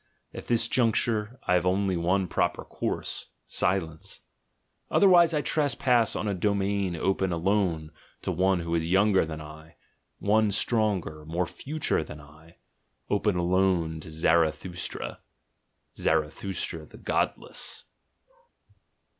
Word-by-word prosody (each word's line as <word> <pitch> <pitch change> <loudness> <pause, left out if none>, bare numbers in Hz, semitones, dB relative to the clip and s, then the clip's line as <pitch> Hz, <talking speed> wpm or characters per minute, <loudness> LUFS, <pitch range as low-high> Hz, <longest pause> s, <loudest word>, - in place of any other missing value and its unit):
At - - -8
this 115 -1 +3
juncture 115 -1 +1
I - - +2
have 90 0 +2
only 95 0 +1
one 90 +3 +1
proper - - -1
course, - - -4 0.2
silence: 85 -4 -1 0.7
otherwise 175 -4 +6
I 150 -2 0
trespass 125 -6 +2
on 105 - -2
a 100 - 0
domain 100 -1 0
open 95 +2 0
alone 85 -3 0 0.3
to - - -1
one 95 0 +2
who 85 0 -3
is 80 0 0
younger 95 0 +4
than 80 -1 -6
I, 80 +1 -12 0.4
one 110 +1 +2
stronger, 100 -9 0
more 85 +4 -1
"future" 135 - -1
than 75 0 -10
I 75 +3 -17 0.3
— - - -46
open 105 -1 +2
alone 90 -2 +1
to 80 - -10
ZaratJmstra, 80 +2 0 0.8
Zarathustra 80 0 -1
the - - -14
godless. - - -2
95 Hz, 120 wpm, -27 LUFS, 80-105 Hz, 0.8 s, otherwise